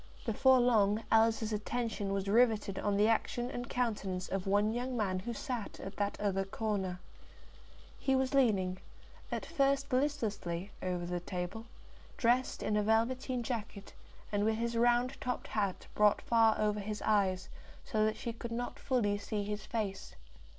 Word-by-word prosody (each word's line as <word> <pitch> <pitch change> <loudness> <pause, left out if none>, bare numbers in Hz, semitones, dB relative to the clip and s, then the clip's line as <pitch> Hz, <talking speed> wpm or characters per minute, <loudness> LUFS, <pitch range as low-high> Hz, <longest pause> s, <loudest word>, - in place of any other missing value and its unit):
Before 260 +3 +5
long 220 -3 +3
Alice's 225 0 +3
attention 210 -1 -2
was 195 0 -1
riveted 215 -3 +3
on 205 -1 0
the 210 +1 +4
action 240 +2 0
and 245 -1 -5
countenance 200 -7 -1
of 195 0 -2
one 205 +2 +3
young 250 +1 -2
man 190 -4 0
who 235 +6 -4
sat 235 -1 -4
at 195 +1 -7
that 205 0 -1
other 195 -2 0
corner. 195 -3 -2 1.0
He 270 - +2
was 265 +1 +1
leaning, 195 -9 +2 0.5
at - - -2
first 275 -3 +1
listlessly, 210 - -1
over 180 -1 -2
the 175 0 -2
table, 180 +6 -5 0.5
dressed 250 +1 +1
in 210 - 0
a 210 - +3
velveteen 240 +4 +1
jacket, 220 -4 -5 0.4
and 205 -1 +1
with 220 +1 +2
his 235 +1 -2
round 240 +3 +2
topped 250 -1 -3
hat 200 -3 -1
brought 210 -1 +3
far 225 -2 +4
over 210 0 +1
his 210 +1 -4
eyes, 195 -3 +2 0.4
so 215 -1 +1
that 215 0 +1
she 235 - -4
could 230 0 -7
not 240 +1 -4
fully 210 -6 +1
see 205 0 -3
his 210 +1 -5
face. 205 -4 -3
215 Hz, 160 wpm, -33 LUFS, 200-240 Hz, 1.0 s, Before